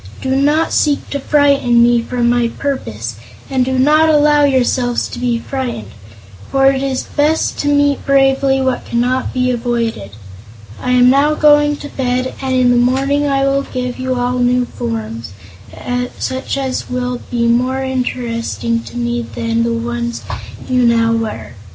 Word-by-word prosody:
"Do 265 0 -1
not 295 +4 +2
seek 290 -2 +1
to 280 - -2
frighten 275 -5 +3
me 240 0 +3
from 240 0 -1
my 240 0 +2
purpose, 120 - -4 0.3
and 260 -1 +2
do 260 +1 -1
not 305 +4 +4
allow 295 -1 +4
yourselves 250 -2 +1
to - - -7
be 245 -1 0
frightened, 240 - -5 0.6
for 270 0 +2
it 270 -1 -2
is 270 -1 -2
best 305 +2 0
to 290 - -1
meet 285 -1 +2
bravely 270 0 +2
what 260 -1 -1
cannot 250 +2 -1
be 255 0 0
avoided. 235 - -2 0.7
I 250 - 0
am 250 0 +5
now 290 +3 +3
going 295 -1 +4
to 290 - -8
bed, 255 -1 -2
and 260 -1 -1
in 250 -1 +3
the 245 - +3
morning 270 +4 +1
I 275 -1 +1
will 275 0 +1
give 250 -2 -5
you 255 0 -1
all 250 0 -1
new 245 0 +2
forms, 115 - -5 0.8
such 260 +1 -3
as 265 -2 -3
will 250 0 -3
be 235 -1 0
more 255 +3 +1
interesting 235 -3 -2
to - - -9
me 240 0 -1
than 230 0 -2
the 235 0 0
ones 235 0 -3 0.4
you 255 -1 +1
now 230 -1 +3
wear. 225 -1 -4
255 Hz, 165 wpm, -16 LUFS, 240-275 Hz, 0.8 s, am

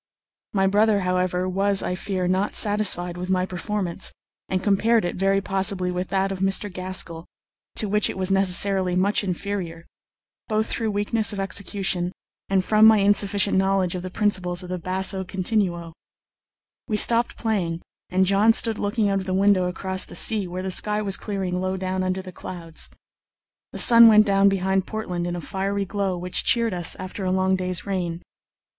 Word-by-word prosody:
My 195 -1 +1
brother, 205 +1 +2
however, 180 0 -1
was, 195 +1 +1
I - - -2
fear, 185 0 -3
not 190 +3 -1
satisfied 185 -4 +1
with 180 +1 -6
my 185 -1 +1
performance, 190 0 -3 0.4
and 185 0 -2
compared 220 +1 +2
it, 175 - -3
very 195 +1 +1
possibly, 190 -1 +1
with 180 +1 -4
that 195 0 -1
of 190 - -5
Mr. 195 +1 0
Gaskell, 185 -3 -5 0.5
to 215 - 0
which 210 +1 +2
it - - -6
was 190 0 -1
necessarily 190 -1 +2
much 200 +3 +1
inferior, 180 -3 -5 0.6
both 215 -1 0
through 225 -1 -2
weakness 210 +1 0
of 200 - -6
execution 195 -2 -2 0.4
and 190 -1 +1
from 215 0 +5
my 220 -1 +6
insufficient 200 -1 +2
knowledge 190 -2 0
of 180 - -5
the 185 - -6
principles 185 -3 -1
of 180 - -10
the 180 0 -4
basso 190 +2 -1
continuo. 180 -3 -2 0.9
We 215 - -1
stopped 235 +2 +4
playing, 180 -7 -2 0.3
and 190 +1 +2
John 200 +4 +3
stood 225 -1 +3
looking 205 +1 -1
out 195 -1 0
of 190 - -8
the 185 - -1
window 195 -2 +2
across 190 +1 -2
the - - -11
sea, 210 -4 +2
where 180 +1 -6
the 190 - -3
sky 210 +3 0
was 195 -2 +1
clearing 190 -3 -3
low 185 0 -2
down 185 0 -3
under 185 0 -2
the 185 - -10
clouds. 165 -3 -8 0.8
The - - -8
sun 235 -1 +9
went 215 -1 +6
down 200 -1 +3
behind 190 0 -1
Portland 180 -6 -4
in 175 - -4
a 175 - -5
fiery 195 +4 -3
glow 195 -1 -3
which 180 +1 +1
cheered 230 -3 +2
us 175 -2 +1
after 185 +2 -7
a 185 - -1
long 190 0 +1
day's 185 -1 -2
rain. 180 -3 -4
190 Hz, 180 wpm, -23 LUFS, 180-205 Hz, 0.9 s, sun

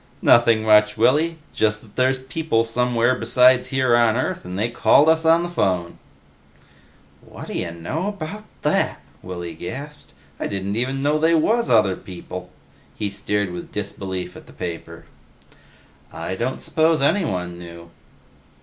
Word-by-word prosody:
"Nothing 115 -2 +5
much, 105 -1 +4
Willy. 160 +4 +2 0.2
Just 105 -1 0
that 105 -2 -19
there's 130 +1 +2
people 130 -2 -1
somewhere 120 +1 +1
besides 125 +1 +4
here 130 -3 +2
on 115 -2 +3
Earth, 130 - -2
and 90 +1 -6
they 110 +4 +1
called 130 +5 +4
us 160 0 +3
on 165 +1 +5
the - - -2
phone." 90 - -1 1.2
"Whadd'ya 90 - -6
know 85 - -4
about 205 +1 -6 0.2
that!" - - 0 0.2
Willy 85 -2 -6
gasped. 140 - -8 0.3
"I - - -2
didn't 100 0 -3
even 130 +4 -1
know 150 +1 +2
they 165 +2 +3
was 225 +9 +2
other 105 -5 +4
people!" 90 0 -9 0.5
He 105 -2 -3
stared 100 -1 -2
with 90 0 -8
disbelief 95 -2 -5
at - - -13
the - - -15
paper. 85 -2 -7 1.1
"I - - -5
don't 120 +7 -3
suppose 160 0 +2
anyone 90 - 0
knew." 85 -1 -11
115 Hz, 145 wpm, -22 LUFS, 95-145 Hz, 1.2 s, Nothing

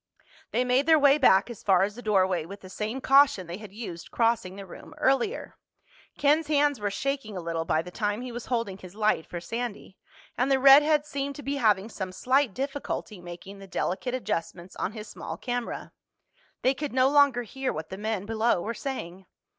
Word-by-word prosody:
They 250 - 0
made 255 +4 +2
their 320 -1 +7
way 285 0 +5
back 195 -7 +5
as 230 - -10
far 190 -2 +4
as 205 +1 -1
the 240 - -10
doorway 190 -6 +2
with 200 +5 -10
the 185 - -12
same 220 +7 -4
caution 270 -8 +5
they 170 +2 -6
had 215 -2 -11
used 195 -6 -8
crossing 230 -5 0
the 200 0 -8
room 195 - -12
earlier. 270 - 0 0.6
Ken's 295 +2 +3
hands 290 -3 +2
were 205 -1 -1
shaking 250 -2 -3
a - - -2
little 165 -1 -3
by 160 0 +1
the 180 - -10
time 210 +2 -2
he 255 - -6
was 240 0 -7
holding 230 -6 -2
his 185 0 -12
light 215 -6 +1
for 175 - -5
Sandy, 230 0 -5 0.4
and 250 +3 +1
the 270 - +5
redhead 295 +3 +7
seemed 280 -1 -4
to 290 - -9
be 280 +1 -2
having 210 -5 +2
some 190 -4 -5
slight 255 +3 +1
difficulty 270 -7 -4
making 175 +3 -10
the 195 - -11
delicate 200 +7 -2
adjustments 175 -6 -4
on - - -2
his 215 -1 -8
small - - -7
camera. 245 -1 -4 0.7
They 260 - +4
could 285 0 -5
no 260 0 +4
longer 280 -3 +4
hear 265 +4 -3
what 155 +1 -6
the 190 - -6
men 215 -2 -2
below 225 -1 +1
were 220 +7 -3
saying. 190 -8 -6
225 Hz, 200 wpm, -27 LUFS, 190-270 Hz, 0.7 s, their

